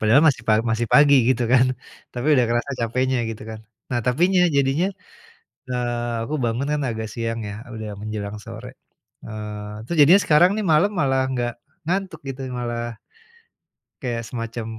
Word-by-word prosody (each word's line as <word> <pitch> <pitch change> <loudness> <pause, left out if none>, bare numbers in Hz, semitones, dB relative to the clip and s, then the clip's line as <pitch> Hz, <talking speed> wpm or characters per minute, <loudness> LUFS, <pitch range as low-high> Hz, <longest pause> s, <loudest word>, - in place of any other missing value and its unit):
padahal 115 +7 +5
masih 125 -5 0
pa 110 - +6 0.2
masih 115 +1 0
pagi 145 -1 +7
gitu 125 -1 +2
kan, 130 0 +6 0.5
tapi 120 +4 -3
udah 125 - +4
kerasa 120 +4 -1
capeknya 130 +3 0
gitu 110 - -8
kan. 110 -1 -8 0.3
Nah 120 - 0
tapinya, 180 +9 +3 0.2
jadinya, 140 +6 +2 0.8
eee, 120 -1 -2
aku 155 - -4
bangun 120 +4 -1
kan 150 - 0
agak 110 0 -4
siang 115 -1 -3
ya 100 - -6 0.2
udah 110 -1 -6
menjelang 105 -1 -5
sore, 115 +2 -8 0.6
eee, 105 0 -7
terus 170 - -3
jadinya 175 +8 +7
sekarang 170 +3 +5
nih 215 - -1
malam 175 +7 +4
malah 135 -2 +2
nggak 120 -1 -1 0.4
ngantuk 185 -3 -2
gitu, 135 0 -6 0.2
malah 120 -1 -4 1.0
kayak 120 -3 -3
semacam 115 -1 -5
120 Hz, 160 wpm, -22 LUFS, 115-140 Hz, 1.0 s, pagi